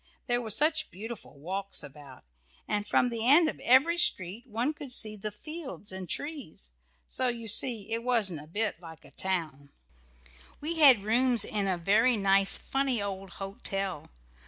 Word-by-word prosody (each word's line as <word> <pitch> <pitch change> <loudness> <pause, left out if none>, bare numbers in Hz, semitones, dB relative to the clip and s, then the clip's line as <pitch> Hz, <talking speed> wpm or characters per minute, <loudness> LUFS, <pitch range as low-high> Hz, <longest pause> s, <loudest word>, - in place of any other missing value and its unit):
There 245 -1 0
were 225 - -6
such 310 +7 +1
beautiful 205 -5 -9
walks 190 +5 -3
all 145 - -9
about, 140 -3 -14 0.4
and 205 0 -2
from 245 - +2
the 230 0 -2
end 315 +4 +6
of - - -4
every 285 +8 +4
street 205 - +1
one 240 +6 -1
could 285 -3 -8
see 215 -3 +1
the 215 +1 -4
fields 275 - -5
and 185 -2 -7
trees, 280 - -4 0.3
so 255 - -2
you 235 -2 -3
see 225 -1 +2
it 230 +1 0
wasn't 215 -10 0
a - - -16
bit 210 +1 -2
like 160 -3 -12
a 140 - -16
town. 155 -5 -2 0.9
We 325 +2 -1
had 260 -9 +8
rooms 235 +1 +2
in 205 -2 -2
a 185 -2 +1
very 220 +7 +3
nice 195 -1 +2
funny 270 -3 -1
old 195 -1 -5
hotel. 195 -4 -5
215 Hz, 170 wpm, -29 LUFS, 190-250 Hz, 0.9 s, had